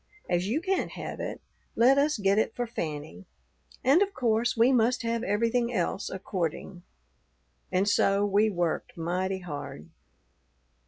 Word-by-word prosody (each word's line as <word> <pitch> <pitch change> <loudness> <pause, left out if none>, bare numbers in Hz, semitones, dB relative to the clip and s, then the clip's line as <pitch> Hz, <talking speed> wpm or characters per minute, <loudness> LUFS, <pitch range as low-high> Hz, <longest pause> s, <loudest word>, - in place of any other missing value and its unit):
As 175 +1 0
you 260 +10 0
can't 380 +2 -1
have - - -6
it, - - -5 0.3
let 260 +4 +5
us 295 0 +2
get 200 0 +2
it 220 - -1
for 245 - -1
Fanny; 150 - -6 0.6
and 275 +8 +5
of 400 -1 0
course 235 0 +1
we 235 +3 +5
must 245 0 +2
have 230 0 -1
everything 230 +3 0
else 195 -1 -1
according.' 185 -1 -4 0.9
And 185 +2 +1
so 200 0 +3
we 205 +2 +3
worked 175 -4 -2
mighty 185 +3 -2
hard. 145 - -7
205 Hz, 145 wpm, -28 LUFS, 180-240 Hz, 0.9 s, let